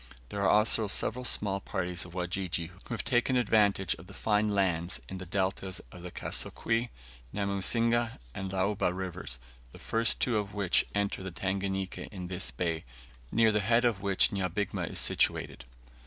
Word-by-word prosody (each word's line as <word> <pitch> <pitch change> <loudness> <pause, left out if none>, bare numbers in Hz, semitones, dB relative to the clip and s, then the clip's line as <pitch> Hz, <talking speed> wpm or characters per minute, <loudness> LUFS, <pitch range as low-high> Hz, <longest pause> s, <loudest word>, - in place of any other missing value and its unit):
There 100 - -3
are 100 - +3
also 105 +1 +4
several 120 +4 0
small 100 -4 +1
parties 90 -3 -2
of 85 - -12
Wajiji, 90 -2 -2
who - - -5
have - - -4
taken 125 0 +2
advantage 105 -5 +3
of 85 - -12
the 100 - -12
fine 105 0 +2
lands 95 -3 +1
in 95 - -6
the 95 - -8
deltas 95 0 -1
of 90 - -11
the 90 - -6
Kasokwe, 115 +6 0 0.4
Namusinga, 115 +4 +2 0.2
and 95 -1 -4
Luaba 95 0 +1
Rivers, 90 -7 -5 0.3
the - - -12
two - - -16
first 115 0 +3
of 105 -4 -1
which 100 -3 +2
enter 100 -1 0
the 95 - -4
Tanganika 95 +1 -3
in 90 -4 -6
this 90 0 -1
bay, 85 -2 -2 0.5
near 115 -1 +5
the 105 - +2
head 115 +4 +3
of 110 -5 +1
which 100 -1 +3
Nyabigma 95 +1 -2
is - - -4
situated. - - +1
100 Hz, 170 wpm, -30 LUFS, 90-105 Hz, 0.5 s, near